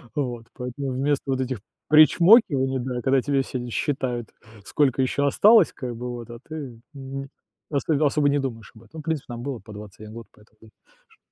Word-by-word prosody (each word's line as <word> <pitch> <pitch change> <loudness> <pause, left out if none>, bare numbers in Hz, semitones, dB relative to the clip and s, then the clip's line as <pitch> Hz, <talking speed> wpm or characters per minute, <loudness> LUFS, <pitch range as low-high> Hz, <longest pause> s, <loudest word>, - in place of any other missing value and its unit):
Вот. 120 -5 -3
Поэтому 125 +2 -5
вместо 140 +2 0
вот 130 - 0
этих 130 -4 -3 0.3
причмокиваний, 155 - +5
да, 125 -1 -3
когда 135 0 +2
тебе 140 0 +1
все 125 -2 -5
считают, 125 -3 -2 0.4
сколько 135 -3 +1
ещё 140 +2 0
осталось 210 +5 +5
как 125 -2 -6
бы 125 +1 -6
вот, 120 -1 -8
а 120 0 -9
ты 140 -7 -7
Мгм. 135 0 -7 0.4
Особ 150 +1 +1
особо 145 0 +2
не 145 0 +2
думаешь 115 -6 -5
об 110 - -16
этом, 110 - -21
ну - - -6
в - - -8
принципе, 160 -3 -2
нам 120 +1 -7
было 135 -4 -4
по 110 - -14
21 105 +1 -11
год, 115 -1 -10
поэтому, 110 +1 -21 0.4
ш 445 -1 -26
130 Hz, 190 wpm, -24 LUFS, 120-145 Hz, 0.4 s, причмокиваний